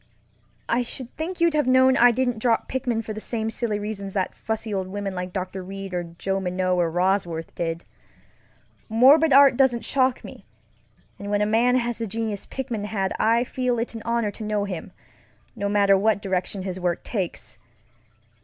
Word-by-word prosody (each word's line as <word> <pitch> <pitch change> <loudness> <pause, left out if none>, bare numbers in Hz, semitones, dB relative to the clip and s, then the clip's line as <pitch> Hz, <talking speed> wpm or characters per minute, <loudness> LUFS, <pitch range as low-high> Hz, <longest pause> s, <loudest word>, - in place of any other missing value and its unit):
I 245 - +2
should 245 0 -6
think 350 +4 -4
you'd 335 -1 +3
have 300 -3 +1
known 260 0 +5
I 245 0 +7
didn't 245 -1 0
drop 230 0 +1
Pickman 245 -4 -2
for 215 - -5
the 215 - -6
same 225 -1 -2
silly 225 -3 -2
reasons 205 -2 -5
that 190 -2 -1
fussy 220 -1 -4
old 190 -1 -2
women 200 0 -4
like 180 0 -4
Dr. 185 0 -4
Reid 195 +1 -7
or 175 - 0 0.2
Joe 195 +1 -1
Minot 185 0 0
or 175 -2 +2
Bosworth 175 -2 -1
did. 165 0 -3 1.0
Morbid 275 +8 +6
art 275 -1 +7
doesn't 255 -4 +2
shock 260 -2 +1
me, - - -11 0.8
and 200 - -6
when 205 0 +1
a - - +2
man 235 +4 +3
has 240 -2 -1
the 225 - -2
genius 220 -1 -3
Pickman 240 -6 -4
had 195 -3 -2
I 230 +2 +3
feel 250 -1 -1
it 230 +1 -3
an 225 - -7
honor 235 -3 0
to 215 - -9
know 210 -1 -1
him, 185 -5 -6 0.6
no 200 -2 -2
matter 200 -1 +4
what 210 +2 +2
direction 190 0 -2
his 185 -1 -4
work 175 -1 -1
takes. 190 -7 -5
215 Hz, 185 wpm, -24 LUFS, 195-245 Hz, 1.0 s, I